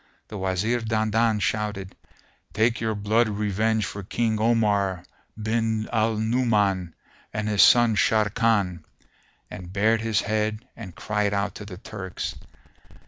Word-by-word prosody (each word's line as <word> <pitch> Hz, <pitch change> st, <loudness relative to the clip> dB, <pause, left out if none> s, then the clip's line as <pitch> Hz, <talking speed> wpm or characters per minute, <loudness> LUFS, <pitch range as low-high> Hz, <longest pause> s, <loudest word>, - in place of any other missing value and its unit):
The 105 Hz, -, -6 dB
Wazir 95 Hz, +6 st, 0 dB
Dandan 110 Hz, 0 st, +1 dB
shouted, 105 Hz, -1 st, -2 dB, 0.6 s
"Take 115 Hz, +1 st, +1 dB
your 110 Hz, -1 st, -1 dB
blood 110 Hz, +3 st, +1 dB
revenge 105 Hz, +1 st, 0 dB
for 100 Hz, -, -6 dB
King 110 Hz, +2 st, -1 dB
Omar 105 Hz, -5 st, +1 dB, 0.4 s
bin 110 Hz, 0 st, -1 dB
al 110 Hz, 0 st, +2 dB
Nu'uman 105 Hz, -6 st, +1 dB, 0.4 s
and 105 Hz, 0 st, -3 dB
his 105 Hz, -2 st, +3 dB
son 120 Hz, -2 st, +6 dB
Sharrkan!"; 105 Hz, -5 st, +1 dB, 0.7 s
and 90 Hz, -1 st, -8 dB
bared 110 Hz, +3 st, +2 dB
his 110 Hz, -2 st, +1 dB
head 110 Hz, +2 st, -2 dB
and 95 Hz, -7 st, -10 dB
cried 105 Hz, -1 st, -1 dB
out 100 Hz, -1 st, -1 dB
to 105 Hz, -, -9 dB
the 95 Hz, -3 st, -9 dB
Turks. 95 Hz, -2 st, -6 dB
105 Hz, 130 wpm, -25 LUFS, 100-110 Hz, 0.7 s, son